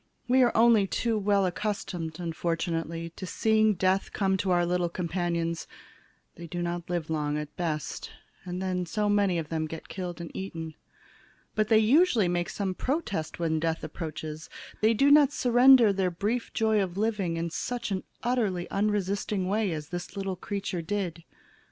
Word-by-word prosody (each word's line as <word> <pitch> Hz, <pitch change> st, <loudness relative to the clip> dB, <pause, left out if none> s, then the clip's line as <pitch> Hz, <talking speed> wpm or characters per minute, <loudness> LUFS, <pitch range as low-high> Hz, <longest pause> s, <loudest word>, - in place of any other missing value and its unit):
We 255 Hz, +1 st, +4 dB
are 245 Hz, -2 st, +5 dB
only 225 Hz, -3 st, +5 dB
too 230 Hz, +3 st, 0 dB
well 200 Hz, -1 st, +2 dB
accustomed, 180 Hz, -4 st, -3 dB
unfortunately, 165 Hz, -1 st, -2 dB
to 185 Hz, -, -6 dB
seeing 220 Hz, +1 st, +3 dB
death 190 Hz, +2 st, +1 dB
come 190 Hz, -1 st, +1 dB
to 190 Hz, 0 st, -2 dB
our 175 Hz, -1 st, +3 dB
little 175 Hz, 0 st, 0 dB
companions; 170 Hz, -1 st, -2 dB, 0.7 s
they 170 Hz, +1 st, -8 dB
do 175 Hz, +1 st, -3 dB
not 175 Hz, 0 st, -4 dB
live 170 Hz, -3 st, -2 dB
long, 150 Hz, -1 st, -1 dB
at 150 Hz, -1 st, -6 dB
best, 160 Hz, -4 st, -3 dB, 0.3 s
and 180 Hz, 0 st, -5 dB
then 185 Hz, -1 st, -2 dB
so 210 Hz, +4 st, 0 dB
many 200 Hz, -3 st, +2 dB
of 160 Hz, -3 st, -4 dB
them 160 Hz, -1 st, -1 dB
get 160 Hz, +1 st, -8 dB
killed 180 Hz, -3 st, -5 dB
and 170 Hz, -1 st, -8 dB
eaten. 165 Hz, -4 st, -5 dB, 0.8 s
But 215 Hz, -1 st, +1 dB
they 220 Hz, -, +5 dB
usually 230 Hz, -, +4 dB
make 175 Hz, 0 st, -1 dB
some 195 Hz, -2 st, -2 dB
protest 255 Hz, -, -2 dB
when 160 Hz, -2 st, 0 dB
Death 165 Hz, 0 st, -1 dB
approaches. 155 Hz, -1 st, -6 dB, 0.3 s
They 220 Hz, +1 st, +4 dB
do 280 Hz, +6 st, +4 dB
not 290 Hz, -1 st, +7 dB
surrender 245 Hz, -4 st, +6 dB
their 190 Hz, -1 st, +1 dB
brief 210 Hz, +7 st, -2 dB
joy 220 Hz, -2 st, +2 dB
of 185 Hz, -1 st, -3 dB
living 205 Hz, -6 st, 0 dB
in 165 Hz, 0 st, -2 dB
such 235 Hz, +3 st, -3 dB, 0.3 s
utterly 215 Hz, -8 st, 0 dB
unresisting 200 Hz, -1 st, 0 dB
way 205 Hz, 0 st, +1 dB
as 150 Hz, -2 st, -5 dB
this 175 Hz, +2 st, -6 dB
little 195 Hz, -1 st, -2 dB
creature 190 Hz, -1 st, -4 dB
did. 175 Hz, -2 st, -3 dB
185 Hz, 165 wpm, -28 LUFS, 170-210 Hz, 0.8 s, not